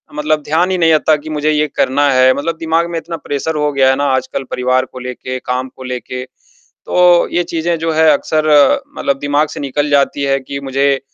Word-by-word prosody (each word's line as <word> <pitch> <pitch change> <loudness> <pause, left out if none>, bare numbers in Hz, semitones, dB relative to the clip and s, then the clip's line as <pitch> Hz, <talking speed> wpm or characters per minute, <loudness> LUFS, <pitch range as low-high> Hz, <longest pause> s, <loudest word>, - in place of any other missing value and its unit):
मतलब 150 0 0
ध्यान 170 +6 +1
ही 185 - 0
नहीं 165 -2 +3
रहता 155 0 +3
कि 155 +2 -10
मुझे 155 0 0
ये 150 0 +1
करना 145 +2 +2
है 130 0 +4
मतलब 160 +4 -3
दिमाग 165 +1 0
में 170 - -3
इतना 165 0 -7
प्रेशर 145 +2 -4
हो 150 0 0
गया 135 -1 +3
है 135 - +3
ना 145 - 0
आजकल 130 +1 -3
परिवार 130 +1 +1
को 130 - -11
लेके, 125 +1 -6
काम 125 +1 -3
को 130 - -9
लेके, 125 0 -5
तो 175 +6 0
ये 175 - +1
चीज़ें 170 0 -2
जो 165 0 -1
हैं 160 0 +3
अक्सर 155 +2 0 0.5
मतलब 140 -1 -1
दिमाग 145 +2 +1
से - - -8
निकल 145 +1 -2
जाती 140 0 +1
है 135 0 +1
कि 140 +1 -7
मुझे 135 0 +1
145 Hz, 215 wpm, -15 LUFS, 130-160 Hz, 0.5 s, है